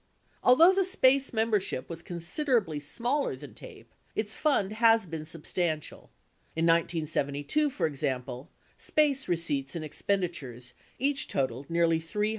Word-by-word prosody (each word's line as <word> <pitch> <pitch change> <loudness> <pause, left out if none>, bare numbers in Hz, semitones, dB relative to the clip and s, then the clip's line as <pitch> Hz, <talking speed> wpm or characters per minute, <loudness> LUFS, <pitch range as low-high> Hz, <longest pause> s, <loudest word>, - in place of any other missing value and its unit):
Although 325 +9 +7
the 385 0 +2
SPACE 275 -7 +3
membership 220 - 0
was 170 -1 -7
considerably 175 - -1
smaller 240 - -1
than - - -11
TAPE, - - -13 0.2
its 215 0 -2
fund 240 -10 +1
has 225 -1 +4
been 160 -2 -6
substantial. 165 -1 -3 0.5
In 165 +1 +1
1972, 165 - +1
for 275 - -1
example, 135 -4 -3 0.3
SPACE 285 -3 +2
receipts 145 -5 -1
and 160 -2 -4
expenditures 150 -8 -3 0.2
each 275 +2 0
totaled 130 0 -2
nearly 165 -1 +2
$300,000. 210 +6 -1
170 Hz, 125 wpm, -29 LUFS, 150-240 Hz, 0.5 s, Although